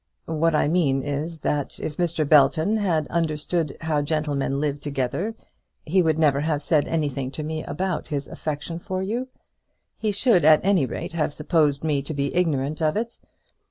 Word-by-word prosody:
What 160 0 +1
I 150 - +3
mean 145 -5 +2
is, 150 +3 -4
that 145 -2 -2
if 150 - -5
Mr. 170 -4 0
Belton 155 +8 +4
had 170 -8 0
understood 160 -1 -1
how 155 -2 0
gentlemen 145 -2 -1
live 145 -1 -1
together 145 - -2 0.5
he 185 +4 +3
would 160 -2 +2
never 145 -3 +3
have 150 -1 -1
said 150 -1 +2
anything 145 -5 -1
to 140 +3 -5
me 155 +1 -3
about 180 +5 -3
his 140 -3 -3
affection 155 +2 -4
for 185 +2 -3
you. 235 +6 -2 0.7
He 215 - 0
should 205 - +3
at 155 +3 +6
any 190 -9 +3
rate 120 - -5
have 155 -3 -1
supposed 150 -2 +1
me 150 -3 +1
to 145 +2 -5
be 140 0 -1
ignorant 155 -3 0
of 155 +3 +1
it. 230 +1 -4
155 Hz, 175 wpm, -24 LUFS, 145-170 Hz, 0.7 s, at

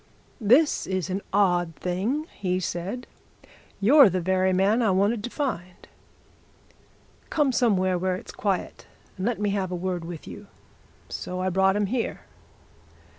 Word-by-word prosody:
'This 255 +8 +3
is 185 -1 -2
an 195 +2 -2
odd 175 -4 +2
thing!' 205 - -2
he 185 -2 0
said. 185 +7 -4 0.7
'You're 265 +4 +7
the 185 0 -1
very 185 +1 +1
man 195 +6 +2
I 225 - +3
wanted 200 +4 +1
to - - -4
find! 185 - -4 1.4
Come 295 -4 +2
somewhere, 190 -8 +2
where 185 0 0
it's 185 - -9
quiet, 195 -3 -3 0.3
and 190 +3 -2
let 240 -3 -1
me 205 -1 0
have 195 -2 -1
a - - -2
word 180 -1 -3
with 165 -1 -8
you.' - - -10 0.6
So 180 0 -5
I 185 0 0
brought 190 +1 +3
him 205 0 +1
here." 235 +4 -2
190 Hz, 150 wpm, -25 LUFS, 185-225 Hz, 1.4 s, You're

